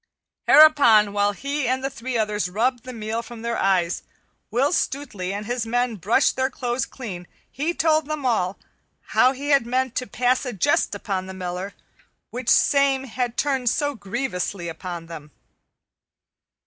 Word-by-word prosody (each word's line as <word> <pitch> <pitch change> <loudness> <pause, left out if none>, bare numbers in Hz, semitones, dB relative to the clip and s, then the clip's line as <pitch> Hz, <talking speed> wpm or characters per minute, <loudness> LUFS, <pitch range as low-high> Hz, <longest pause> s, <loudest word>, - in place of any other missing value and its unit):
Hereupon, 235 -10 +7
while 205 0 +2
he 280 +5 -3
and 260 +1 0
the 270 - 0
three 245 0 -4
others 210 -3 -1
rubbed 235 +5 0
the 255 - -6
meal 225 -1 -3
from 235 -1 -11
their 235 0 -2
eyes, 180 -3 +1
and - - -31 0.4
Will 265 +8 +1
Stutely 245 - -2
and 205 +2 -4
his 245 +1 -2
men 245 0 0
brushed 215 - +2
their 260 0 0
clothes 245 -2 -2
clean, 185 -9 -8 0.2
he 320 +5 -2
told 315 -2 +2
them 305 -3 -4
all; 200 -6 0 0.6
how 255 - +5
that 265 - -8
he 285 +2 -5
had 275 -5 +3
meant 255 0 0
to 255 - -2
pass 250 +1 +1
a 250 -3 -4
jest 200 +1 +1
upon 195 -2 -3
the 190 - -8
Miller, 185 +1 -5 0.6
which 245 -1 -3
same 280 -2 +4
had 245 -1 -3
turned 265 -4 +1
so 290 +3 0
grievously 200 -5 -4
upon 170 0 -7
them. 160 -3 -10
240 Hz, 170 wpm, -23 LUFS, 200-265 Hz, 0.6 s, Hereupon